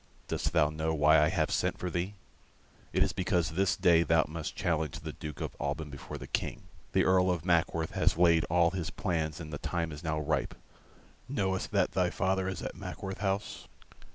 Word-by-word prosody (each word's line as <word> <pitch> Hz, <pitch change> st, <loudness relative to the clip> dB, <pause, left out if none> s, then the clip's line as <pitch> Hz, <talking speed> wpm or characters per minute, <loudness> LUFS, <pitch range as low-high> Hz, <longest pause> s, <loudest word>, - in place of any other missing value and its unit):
Dost 75 Hz, -, -1 dB
thou 75 Hz, -2 st, +3 dB
know 80 Hz, +1 st, -1 dB
why 75 Hz, +1 st, +5 dB
I 75 Hz, -, +4 dB
have -, -, 0 dB
sent -, -, 0 dB
for 90 Hz, -, -4 dB
thee? 90 Hz, +4 st, -2 dB, 0.8 s
It -, -, +3 dB
is -, -, -1 dB
because 90 Hz, -3 st, 0 dB
this 95 Hz, +4 st, +2 dB
day 85 Hz, -2 st, +5 dB
thou 80 Hz, -1 st, +3 dB
must 80 Hz, 0 st, -5 dB
challenge 80 Hz, -4 st, -1 dB
the -, -, -6 dB
Duke 75 Hz, -3 st, -7 dB
of -, -, -4 dB
Alban 75 Hz, +1 st, -3 dB
before 70 Hz, -, -7 dB
the -, -, -8 dB
King. -, -, -3 dB, 0.3 s
The 95 Hz, -, +4 dB
Earl 95 Hz, 0 st, +4 dB
of 85 Hz, -2 st, -1 dB
Mackworth 85 Hz, -2 st, +1 dB
has -, -, +1 dB
laid 85 Hz, -2 st, +5 dB
all 85 Hz, 0 st, +3 dB
his 90 Hz, -3 st, -3 dB
plans 80 Hz, -4 st, -2 dB
and 80 Hz, -2 st, -8 dB
the 75 Hz, -, -4 dB
time 85 Hz, -2 st, -2 dB
is 75 Hz, +1 st, -8 dB
now 80 Hz, -2 st, -1 dB
ripe. 75 Hz, +1 st, -1 dB, 0.7 s
Knowest 95 Hz, -8 st, -1 dB
that -, -, +2 dB
thy 90 Hz, 0 st, +2 dB
father 95 Hz, +1 st, 0 dB
is 95 Hz, -2 st, -4 dB
at -, -, -4 dB
Mackworth 95 Hz, -1 st, -6 dB
House?" 100 Hz, 0 st, -2 dB
85 Hz, 200 wpm, -30 LUFS, 80-95 Hz, 0.8 s, why